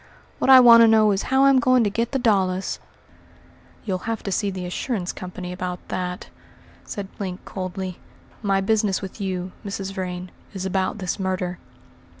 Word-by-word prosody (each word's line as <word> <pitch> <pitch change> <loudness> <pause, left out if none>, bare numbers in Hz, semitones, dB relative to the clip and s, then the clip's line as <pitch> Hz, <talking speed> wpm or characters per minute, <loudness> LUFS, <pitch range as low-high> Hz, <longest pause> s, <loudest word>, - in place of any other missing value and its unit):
What - - +1
I 260 -1 +10
want 235 -2 +9
to 230 - +8
know 220 -1 +5
is 195 -1 0
how 265 +1 +4
I'm 275 -1 +6
going 255 0 +4
to 210 - +1
get 230 +2 -1
the 275 - 0
dollars." 195 -6 +1 1.1
"You'll 190 +1 -3
have 225 -2 -3
to 200 - -3
see 200 +2 0
the 185 -2 -5
assurance 180 +1 -3
company 180 0 -7
about 180 0 -4
that," 180 0 -4 0.5
said 200 -2 -6
Link 185 -2 -5
coldly; 185 -1 -5 0.4
"my 195 -2 +1
business 210 -1 +1
with 195 +2 -8
you, 185 -1 -3
Mrs. 195 -1 -5
Vrain, 180 -1 -5 0.2
is 190 -1 -4
about 190 +1 -1
this 185 +1 -3
murder." 185 -1 -2
195 Hz, 170 wpm, -23 LUFS, 185-220 Hz, 1.1 s, I